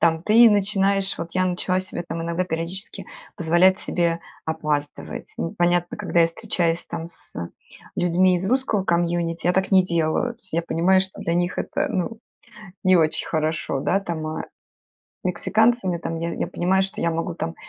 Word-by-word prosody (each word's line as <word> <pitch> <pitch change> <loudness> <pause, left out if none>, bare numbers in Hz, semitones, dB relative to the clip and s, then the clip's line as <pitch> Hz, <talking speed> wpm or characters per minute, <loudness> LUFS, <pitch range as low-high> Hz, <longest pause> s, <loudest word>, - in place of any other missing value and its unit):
Там 165 -1 +2
ты 230 +3 +7
начинаешь, 195 -1 +2
вот 165 - -4
я 185 0 +1
начала 185 0 0
себе 185 -2 -5
там 165 0 -3
иногда 170 +2 -1
периодически 175 +3 -3 0.3
позволять 175 +3 +4
себе 170 -1 0 0.3
опаздывать. 150 -2 -3
Ну 85 - -3
понятно, 175 +2 +1
когда 190 -4 +1
я 165 - +6
встречаюсь 170 -2 -1
там 165 -1 -5
с 170 - -11 0.6
людьми 180 +1 +3
из 190 +2 -2
русского 255 -5 +1
комьюнити, 170 -1 0
я 180 - +4
так 190 +1 0
не 190 -2 +5
делаю, 170 +7 0
то - - -29
есть 190 -6 -4
я 170 - +1
понимаю, 180 +3 +3
что 190 0 -1
для 170 - -1
них 175 +1 0
это, 295 0 -1
ну, 220 0 -2 0.7
не 185 0 +5
очень 160 -3 +2
хорошо, 155 -3 -1
да. 195 +7 +2
Там, 170 -5 -4
а, 155 0 -4 0.8
мексиканцам 215 +3 +2
я 170 - -2
там 165 0 -4
я 170 +1 -3
я - - -2
понимаю, 190 +2 +1
что 195 0 -3
я 170 - +2
могу 165 +1 -2
там 165 -1 -4
175 Hz, 180 wpm, -23 LUFS, 165-190 Hz, 0.8 s, ты